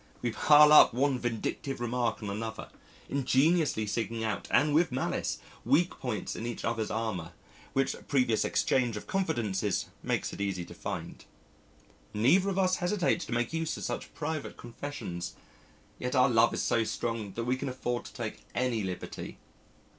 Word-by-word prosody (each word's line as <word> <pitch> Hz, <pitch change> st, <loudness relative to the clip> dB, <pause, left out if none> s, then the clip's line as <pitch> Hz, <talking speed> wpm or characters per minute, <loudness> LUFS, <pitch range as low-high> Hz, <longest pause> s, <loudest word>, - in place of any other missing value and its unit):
We 120 Hz, -, +1 dB
pile 150 Hz, +4 st, +7 dB
up 140 Hz, -, +8 dB
one 135 Hz, 0 st, +2 dB
vindictive 120 Hz, +3 st, -3 dB
remark 120 Hz, -1 st, -1 dB
on 100 Hz, -, -3 dB
another, 110 Hz, +2 st, -5 dB, 0.4 s
ingeniously 140 Hz, -2 st, +2 dB
seeking 115 Hz, +2 st, -2 dB
out 110 Hz, -2 st, -2 dB
and 150 Hz, +1 st, +3 dB
with 165 Hz, 0 st, +3 dB
malice 130 Hz, -, -1 dB, 0.3 s
weak 150 Hz, +9 st, +3 dB
points 120 Hz, -5 st, -3 dB
in 115 Hz, -, -4 dB
each 120 Hz, -, -4 dB
other's 115 Hz, -2 st, -1 dB
armour, 100 Hz, -7 st, -3 dB, 0.4 s
which 135 Hz, 0 st, +1 dB
previous 125 Hz, -6 st, +2 dB
exchange 120 Hz, -4 st, +1 dB
of -, -, -7 dB
confidences 115 Hz, -, -1 dB
makes -, -, -1 dB
it -, -, -6 dB
easy 95 Hz, -3 st, -2 dB
to -, -, -11 dB
find. -, -, -6 dB, 0.9 s
Neither 165 Hz, -, +4 dB
of 195 Hz, -, -2 dB
us 185 Hz, -1 st, +3 dB
hesitates 180 Hz, -1 st, +1 dB
to -, -, -9 dB
make 120 Hz, +3 st, 0 dB
use 165 Hz, -1 st, -1 dB
of -, -, -7 dB
such -, -, -4 dB
private 155 Hz, -1 st, -4 dB
confessions, 115 Hz, -8 st, -6 dB, 0.6 s
yet 125 Hz, +2 st, -2 dB
our 125 Hz, +1 st, +5 dB
love 115 Hz, -1 st, +5 dB
is -, -, -1 dB
so 115 Hz, -1 st, +2 dB
strong 110 Hz, -3 st, -3 dB
that 115 Hz, -, -3 dB
we 125 Hz, +2 st, +1 dB
can 135 Hz, +1 st, -4 dB
afford 120 Hz, -1 st, -3 dB
to -, -, -10 dB
take -, -, -5 dB, 0.2 s
any 125 Hz, -3 st, +1 dB
liberty. 95 Hz, -2 st, -5 dB
120 Hz, 165 wpm, -30 LUFS, 110-145 Hz, 0.9 s, up